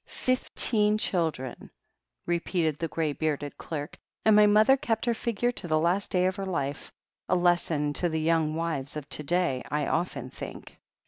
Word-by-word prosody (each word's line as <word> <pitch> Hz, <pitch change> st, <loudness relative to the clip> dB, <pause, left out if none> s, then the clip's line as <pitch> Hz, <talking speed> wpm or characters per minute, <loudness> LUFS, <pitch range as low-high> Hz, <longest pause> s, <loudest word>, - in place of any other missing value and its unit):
Fifteen 215 Hz, -4 st, +2 dB
children," 160 Hz, -, -2 dB, 0.6 s
repeated 170 Hz, -3 st, -1 dB
the 165 Hz, -, -1 dB
grey 160 Hz, -2 st, -1 dB
bearded 145 Hz, -2 st, -2 dB
clerk, 150 Hz, -2 st, -6 dB, 0.3 s
and 220 Hz, -1 st, +6 dB
my 210 Hz, 0 st, +7 dB
mother 215 Hz, +5 st, +6 dB
kept 225 Hz, -4 st, -1 dB
her 240 Hz, -, +2 dB
figure 235 Hz, +1 st, -1 dB
to 210 Hz, -, -5 dB
the 155 Hz, -1 st, +2 dB
last 175 Hz, +5 st, +1 dB
day 180 Hz, -1 st, +2 dB
of 185 Hz, 0 st, 0 dB
her 195 Hz, -, -3 dB
life. 145 Hz, -6 st, -3 dB, 0.4 s
A 185 Hz, -, +3 dB
lesson 170 Hz, -4 st, +1 dB
to 175 Hz, -, +2 dB
the 160 Hz, 0 st, -1 dB
young 160 Hz, -1 st, +1 dB
wives 160 Hz, -5 st, -3 dB
of 150 Hz, -2 st, -6 dB
to -, -, -1 dB
day, 170 Hz, -4 st, 0 dB
I 150 Hz, 0 st, 0 dB
often 135 Hz, -7 st, -2 dB
think." -, -, -9 dB
170 Hz, 175 wpm, -27 LUFS, 150-200 Hz, 0.6 s, my